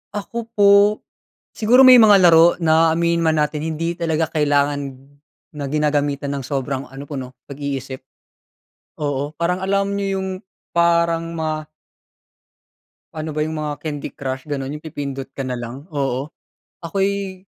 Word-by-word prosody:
Ako 225 +3 -5
po, 205 -1 +5 0.8
siguro 245 +4 +4
may 255 -1 +9
mga 210 -3 +7
laro 170 0 +6
na 160 0 +4
aminin 170 0 +1
man 160 -1 +2
natin 150 0 -3
hindi 160 +1 -2
talaga 160 -2 -1
kailangan 145 -2 0 0.6
na 140 - -3
ginagamitan 145 -1 0
ng 140 -2 -4
sobrang 135 -1 -3
ano 135 +2 -9
po 145 0 -8
'no, 130 0 -9
pag-iisip. 135 -2 -5 1.0
Oo 145 +1 -2
parang 175 +3 -1
alam 200 +1 0
nyo 200 - -2 0.2
yung 190 - -3 0.5
parang 170 -1 +2
ma 155 -1 -3 1.5
Ano 155 0 -4
ba 150 - -4
yung 155 +1 -1
mga 150 -2 -4
Candy 145 -2 -5
Crush 130 -1 -5
ganun 140 -1 -4
yung 150 - -10
pipindot 140 -3 -5
ka 135 - -5
na 125 - -2
lang. 120 +6 -8
Oo, 135 0 -1 0.5
ako'y 195 +1 -2
155 Hz, 145 wpm, -20 LUFS, 140-170 Hz, 1.5 s, may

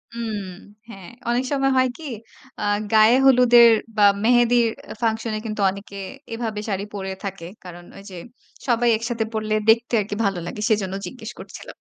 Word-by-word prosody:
উম 220 -3 -4 0.5
হ্যাঁ, 195 -5 -11 0.2
অনেক 240 +2 +1
সময় 270 -1 +1
হয় 255 0 +3
কি? 325 - -12 0.6
আ - - -3 0.3
গায়ে 220 +2 +6
হলুদের 240 -2 +7 0.3
বা 210 - +4 0.2
মেহেদির 240 0 +4 0.2
আ - - -5
function 225 0 -1
এ - - -4
কিন্তু 215 -1 -4
অনেকে 200 +1 -9 0.4
এভাবে 225 -2 -4
শাড়ি 195 -1 -2
পড়ে 195 -1 -5
থাকে। 195 -4 -6 0.2
কারণ 175 -1 -11
ওইযে 195 -1 -11 0.5
সবাই 240 0 +2
একসাথে 230 0 -3
পড়লে 215 0 -2 0.2
দেখতে 230 +2 +3
আরকি 205 0 -5
ভালো 195 -3 -1
লাগে। 210 - -6
সেজন্য 200 -4 0
জিজ্ঞেস 240 -3 -9
করছিলাম। - - -10
220 Hz, 160 wpm, -22 LUFS, 200-240 Hz, 0.6 s, হলুদের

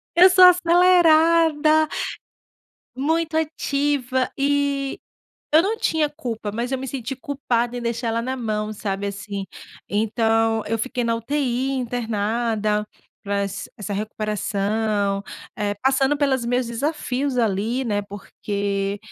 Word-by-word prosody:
Eu 365 +2 +8
sou 370 0 +8
acelerada. 330 -3 +5 1.1
Muito 320 +4 0
ativa, 280 -4 -1
eh, 280 -1 0 0.5
eu 320 +2 +7
não 430 +4 -1
tinha 315 -8 +1
culpa, 235 -8 -5
mas, 235 +5 -3
eu 265 - 0
me 265 - -5
senti 265 0 -4
culpada, 250 -4 -2
em 245 - -5
deixar 235 0 -2
ela 230 +1 -1
na 260 +2 -2
mão 215 -3 -2
sabe, 200 -1 -3
assim. 200 0 -5 0.4
Então, 225 +1 +1
eu 225 +1 -1
fiquei 245 +1 -2
na 230 0 +1
UTI 260 +1 -1
internada, 225 -3 -1 0.4
pra 200 -1 -1
ess 200 0 -6
essa 205 -1 -5
recuperação. 210 -1 -1 0.3
Eh, 205 -1 -1
passando 270 +2 +3
pelas 275 -4 +1
meus 245 +1 0
desafios 265 +1 -2
ali, 225 +3 0
né. 205 -3 0
Porque, 200 0 -3
240 Hz, 125 wpm, -22 LUFS, 215-285 Hz, 1.1 s, Eu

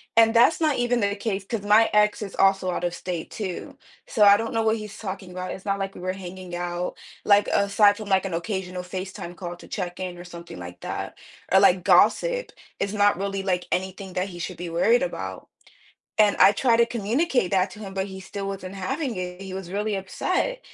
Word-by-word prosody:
And 225 0 +6
that's 245 +8 +5
not 305 -3 +2
even 245 -1 +1
the 200 0 +1
case, 200 -2 -2
'cause 225 -2 -3
my 215 +2 +5
ex 210 +1 +3
is 200 - -6
also 195 -1 +3
out 175 - -3
of 175 - -1
state, 175 -3 -5
too. 190 -5 -5 0.3
So 210 - +2
I 200 0 +8
don't 225 +1 -3
know 225 - +1
what 220 0 +2
he's 215 -1 -8
talking 190 -3 -6
about, 185 0 -5
it's 195 - -8
not 200 0 0
like 195 0 -3
we - - -9
were 185 0 -2
hanging 185 -1 -8
out. 175 0 -3 0.3
Like 205 0 +5
aside 205 +1 +4
from, 215 -2 -7
like, 190 0 +3
an 185 - -3
occasional 180 0 -3
FaceTime 185 -1 -6
call 175 -1 -6
to - - -14
check-in 180 -1 -4
or 175 - -9
something 170 - -10
like 90 0 -9
that, - - -5 0.3
or 190 - +7
like 185 -2 +4
gossip, - - +3 0.3
it's 200 +1 -1
not 205 -2 +3
really, 195 0 -2
like, 180 -2 0
anything 190 0 -3
that 185 +2 -1
he 175 -1 -9
should - - -5
be 175 0 -5
worried 470 - +3
about. - - -5 0.7
And 210 -1 +5
I 200 - +8
tried 230 +1 +2
to 235 - +5
communicate 235 - 0
that 190 0 +2
to - - -12
him, 195 -2 -8
but 190 0 -1
he 190 -1 -8
still 195 +1 -6
wasn't 195 -1 -6
having 255 - -3
it, 180 0 -5
he 190 -1 -7
was 190 -2 -6
really 210 +1 -1
upset. 370 - -1
195 Hz, 220 wpm, -25 LUFS, 185-215 Hz, 0.7 s, I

